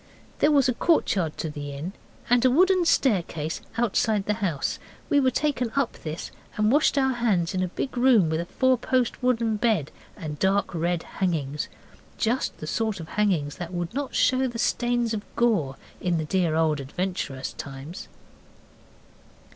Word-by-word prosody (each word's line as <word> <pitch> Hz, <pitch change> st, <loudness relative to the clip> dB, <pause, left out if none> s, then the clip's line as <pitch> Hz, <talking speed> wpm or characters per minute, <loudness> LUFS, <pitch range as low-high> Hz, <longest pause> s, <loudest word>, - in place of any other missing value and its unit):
There 295 Hz, -, +4 dB
was 280 Hz, -3 st, +4 dB
a 255 Hz, -, +2 dB
courtyard 190 Hz, -, +1 dB
to 160 Hz, -, -3 dB
the 145 Hz, -1 st, -6 dB
inn 155 Hz, +7 st, -5 dB, 0.3 s
and 245 Hz, 0 st, +4 dB
a 255 Hz, -, +6 dB
wooden 365 Hz, +6 st, +4 dB
staircase 170 Hz, -, +1 dB, 0.2 s
outside 220 Hz, -3 st, +1 dB
the 210 Hz, -, +1 dB
house. 170 Hz, -8 st, -1 dB, 0.3 s
We 285 Hz, -, +5 dB
were 260 Hz, -2 st, +4 dB
taken 255 Hz, -3 st, 0 dB
up 275 Hz, -4 st, +1 dB
this, 155 Hz, +2 st, -5 dB, 0.3 s
and 215 Hz, +1 st, +3 dB
washed 290 Hz, +1 st, +3 dB
our 265 Hz, -1 st, +3 dB
hands 205 Hz, -8 st, +1 dB
in 185 Hz, -, 0 dB
a 185 Hz, -, +1 dB
big 255 Hz, +9 st, -4 dB
room 240 Hz, -7 st, +5 dB
with 160 Hz, 0 st, 0 dB
a 170 Hz, -, -6 dB
fourpost 255 Hz, 0 st, +1 dB
wooden 230 Hz, -3 st, +1 dB
bed 210 Hz, -, +1 dB, 0.3 s
and 150 Hz, -4 st, -6 dB
dark 195 Hz, 0 st, +1 dB
red 170 Hz, 0 st, -1 dB
hangings 150 Hz, -6 st, -2 dB, 0.5 s
just 240 Hz, +3 st, 0 dB
the -, -, -7 dB
sort 220 Hz, +4 st, -1 dB
of 160 Hz, -, -8 dB
hangings 175 Hz, -9 st, 0 dB
that 175 Hz, 0 st, -6 dB
would 175 Hz, +2 st, -3 dB
not 280 Hz, +1 st, -3 dB
show 260 Hz, +1 st, +3 dB
the 240 Hz, -2 st, -5 dB
stains 240 Hz, 0 st, +1 dB
of 215 Hz, -, -2 dB
gore 200 Hz, -, +2 dB, 0.3 s
in 175 Hz, -2 st, +1 dB
the 155 Hz, -, -2 dB
dear 170 Hz, -1 st, +1 dB
old 160 Hz, -2 st, +2 dB
adventurous 140 Hz, -2 st, -3 dB
times. 140 Hz, +5 st, -8 dB
200 Hz, 170 wpm, -25 LUFS, 160-245 Hz, 0.5 s, a